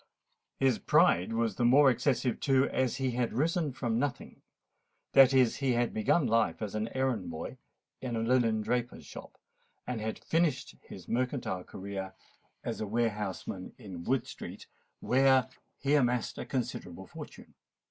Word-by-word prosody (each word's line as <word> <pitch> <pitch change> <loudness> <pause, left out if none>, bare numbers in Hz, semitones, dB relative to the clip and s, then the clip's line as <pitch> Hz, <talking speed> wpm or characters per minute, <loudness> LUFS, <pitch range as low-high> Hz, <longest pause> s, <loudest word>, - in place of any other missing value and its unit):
His 130 -4 +3
pride 90 +5 +3
was 115 -3 -1
the - - 0
more 135 +3 +6
excessive 125 0 0
too, 135 0 +3
as 130 -3 0
he 130 -1 -1
had 120 -1 -1
risen 160 +3 0
from 120 -3 -1
nothing: 140 -1 -4 0.7
that 135 -1 +8
is, 130 -4 +3
he 135 -3 +1
had 120 0 0
begun 110 +8 +2
life 115 -1 +2
as 105 -3 -4
an 110 +1 -1
errand 125 -9 0
boy 80 -1 -6 0.4
in 125 -3 -3
a 115 - -1
linen 115 -2 +2
draper's 120 +1 -2
shop, - - -11 0.5
and 125 -3 -3
had 110 0 -3
finished 160 -5 0
his - - -12
mercantile 125 -6 -2
career 95 0 -6 0.5
as - - -4
a 110 - -2
warehouseman 105 -4 -2
in 90 -5 -8
Wood 130 +7 0
Street, - - -9 0.4
where 130 0 +4 0.3
he 140 +1 0
amassed 125 -4 +1
a - - -5
considerable 130 -4 -4
fortune. - - -11
120 Hz, 155 wpm, -30 LUFS, 110-130 Hz, 0.7 s, that